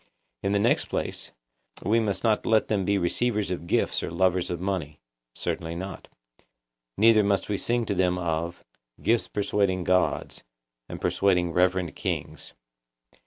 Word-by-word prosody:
In 100 - 0
the 100 - +3
next 100 - +2
place, - - -4 0.5
we 110 +5 +3
must 100 -4 -1
not 110 -2 +2
let 110 -1 +3
them 100 -3 +1
be 100 +1 +2
receivers 105 +3 0
of 85 -2 -4
gifts - - +1
or - - -3
lovers 90 +1 +1
of 85 - -3
money. 90 -6 -3 0.4
Certainly 80 0 -3
not. 95 +1 -7 0.9
Neither 110 0 +6
must 100 -1 0
we 100 - 0
sing 120 0 0
to 100 - -1
them 90 -1 +1
of 85 0 -3 0.4
'Gifts 115 0 +2
persuading 100 -2 0
gods, 90 +1 0 0.5
and - - -6
persuading 90 -3 +2
reverend 90 -2 +1
kings. - - -4
95 Hz, 150 wpm, -26 LUFS, 90-105 Hz, 0.9 s, Neither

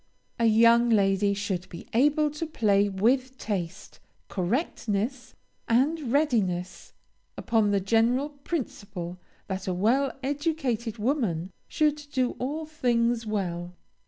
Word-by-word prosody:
A 230 - +3
young 230 +2 +5
lady 200 -2 +3
should 190 -3 -3
be 170 - -10
able 295 +5 +3
to 300 +2 -4
play 205 -8 +2
with 255 +7 +1
taste, 185 -8 -5 0.3
correctness, 230 - -2 0.3
and 270 +3 +1
readiness, 205 - 0 0.4
upon 220 -3 +2
the 200 -1 +2
general 230 +8 +2
principle 200 - -5 0.3
that 190 -1 -5
a 185 - 0
well 250 +8 +2
educated 275 -6 -1
woman 210 - -1 0.2
should 300 -1 +1
do 255 -3 +1
all 295 +5 -3
things 240 -6 0
well. 180 -4 -3
230 Hz, 115 wpm, -27 LUFS, 195-275 Hz, 0.4 s, young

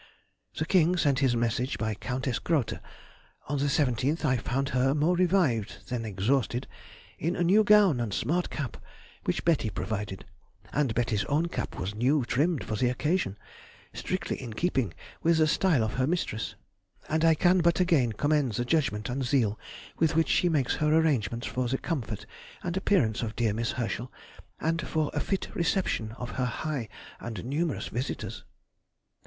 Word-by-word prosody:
The 160 - -1
King 180 0 +3
sent 140 -5 +2
his 130 -3 +3
message 120 0 0
by 110 +1 -1
Countess 130 +3 -2
Grote. 150 -9 0 0.7
On 145 0 -1
the 140 - +1
17th 140 +2 +1
I 130 -3 +3
found 135 +3 -1
her, 130 +2 +2
more 155 +4 +2
revived 170 - +1
than 120 -2 -2
exhausted, 120 +5 0 0.5
in 170 +4 0
a 175 - 0
new 200 +5 +5
gown 205 -9 +5
and 115 -3 -2
smart 165 - 0
cap, 135 -7 -4 0.5
which 90 - -1
Betty 160 -10 +2
provided; 100 0 -4 0.5
and 135 -6 +1
Betty's 115 -4 +1
own 155 +4 +1
cap - - -4
was 95 +3 -3
new 130 +5 +2
trimmed 150 +5 +1
for 110 - -3
the 125 +3 +2
occasion, 135 - 0 0.6
strictly - - -3
in 120 -4 -6
keeping 130 - 0 0.3
with 165 0 +3
the 155 - +5
style 155 -4 +3
of 110 - -2
her 130 0 +1
mistress, 155 -10 -2 0.5
and 160 +1 0
I 165 -1 +6
can 180 +3 +4
but 170 +1 +3
again 160 -10 +3
commend 145 +1 +1
the 120 +4 -1
judgment 125 -8 0
and 130 +2 -2
zeal 120 -5 +1 0.4
with 160 -1 +2
which 165 0 +3
she 180 - +3
makes 145 -6 +1
her 150 0 +2
arrangements 125 -8 +2
for 130 -1 -1
the 130 +3 0
comfort 125 - -4 0.4
and 175 0 -2
appearance 180 - +2
of 115 -1 -3
dear 115 -3 +1
Miss 115 +2 -1
Herschel, 120 0 -3 0.5
and 165 +1 0
for 155 -1 -1
a 145 - 0
fit 195 +5 -2
reception 165 - 0
of 125 +1 -6
her - - +2
high 125 -1 -3 0.3
and 115 -3 -6
numerous 150 +4 -1
visitors. 125 +4 -4
135 Hz, 170 wpm, -28 LUFS, 115-160 Hz, 0.7 s, I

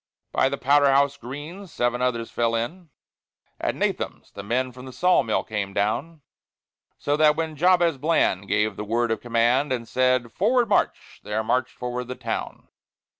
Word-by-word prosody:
By 135 - +2
the 140 - -3
Powder 140 +2 +4
House 140 +1 +3
Green 145 - -8
seven 120 -6 -1
others 120 -2 -1
fell 115 -1 0
in; 160 +10 -4 0.7
At - - -1
Nahum's, - - -3
the 100 - -8
men 125 +5 -1
from 125 +1 -11
the - - -8
Saw 180 +5 +3
Mill 110 - -1
came 100 -3 -4
down; 140 +11 -1 0.8
So 145 - 0
that 150 -1 +5
when 160 -1 -3
Jabez 170 -2 +3
Bland 130 - +1
gave 105 +2 0
the - - -4
word 115 +2 0
of 115 - -1
command, 120 +4 +2
And 120 -3 -2
said, 125 -2 +1
"Forward, 235 +5 +2
march!" 200 - -1
there 105 +1 -2
marched 125 +3 0
forward 125 0 -4
THE 125 - -5
TOWN. - - -5
130 Hz, 175 wpm, -24 LUFS, 115-150 Hz, 0.8 s, that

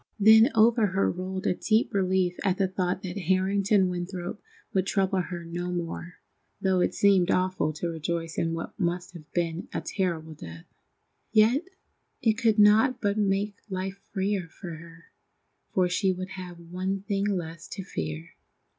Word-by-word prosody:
Then 220 +4 +8
over 225 0 +5
her 195 +1 +1
rolled 185 +1 -5
a - - +3
deep 220 +5 +1
relief 185 -2 +1
at 190 -2 +1
the 195 - +2
thought 185 0 -2
that 185 +1 -4
Harrington 195 +1 +3
Winthrop 180 +2 -4 0.3
would 190 0 +1
trouble 195 -2 +1
her 175 -1 -6
no 175 +2 -4
more, 175 0 -4 0.4
though 190 -1 +2
it - - +1
seemed 195 -3 +4
awful 185 -4 +1
to 160 +3 -3
rejoice 165 0 -3
in 165 0 0
what 165 - -7
must 180 0 -1
have 160 -3 -12
been 170 0 -1
a - - -2
terrible 170 -5 -2
death. 85 - -10 0.7
Yet 230 +9 +4 0.5
it 225 - +3
could 220 0 +2
not 220 +5 +5
but 205 -3 0
make 200 0 0
life 190 +1 -4
freer 195 -2 -1
for 175 +1 -9
her, 165 +1 -12 0.7
for 185 -1 +2
she 190 +2 +1
would 185 0 -5
have 185 -2 -8
one 185 +3 -3
thing 200 -1 -1
less 170 -4 -3
to 195 - -6
fear. 80 - -5
185 Hz, 165 wpm, -27 LUFS, 175-200 Hz, 0.7 s, Then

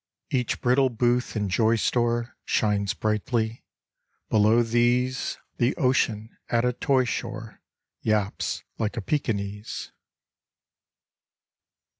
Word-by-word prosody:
Each 125 -3 0
brittle 130 +2 +3
booth 120 +1 0
and 105 -2 0
joy 110 +4 +3
store 120 +1 0
Shines 100 -2 +1
brightly. 110 +2 -1 0.7
Below 110 +2 +5
these 120 +3 +1 0.2
The 120 +1 +2
ocean 115 -6 +1
at 115 0 +2
a 125 - +2
toy 130 +1 +2
shore 115 -2 -5 0.4
Yaps 105 -3 -1 0.2
like 110 +1 -1
a - - -1
Pekinese. 105 -4 -3
115 Hz, 100 wpm, -26 LUFS, 110-125 Hz, 0.7 s, Below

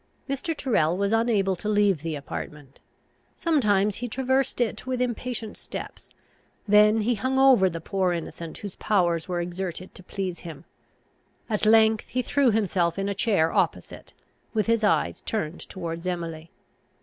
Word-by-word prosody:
Mr. 285 +4 -3
Tyrrel 175 - +1
was 200 +1 0
unable 215 -4 +2
to 210 +4 -4
leave 205 -6 +3
the 165 -1 -3
apartment. 145 -1 -8 0.6
Sometimes 210 - +2
he 245 - -4
traversed 260 +2 0
it 240 +1 -1
with 255 -1 -1
impatient 240 -2 -3
steps; - - -8 0.6
then 210 +1 +5
he 235 +3 +1
hung 260 +4 -1
over 260 -8 +6
the 165 -1 -5
poor 185 +2 0
innocent 165 -1 -5
whose 200 -3 -8
powers 175 -6 +1
were 180 -1 -2
exerted 180 +1 -5
to - - -12
please 185 -1 -4
him; 160 -2 -10 0.9
at 215 0 +1
length 220 0 +5
he 255 +1 -1
threw 280 -1 +2
himself 190 -6 +1
in 195 0 -1
a - - 0
chair 195 -6 +1
opposite, - - -2 0.4
with 215 - +2
his 230 -1 +1
eyes 210 - +1
turned 180 -7 -3
towards 170 -1 -5
Emily. 165 -2 -4
200 Hz, 155 wpm, -25 LUFS, 175-230 Hz, 0.9 s, over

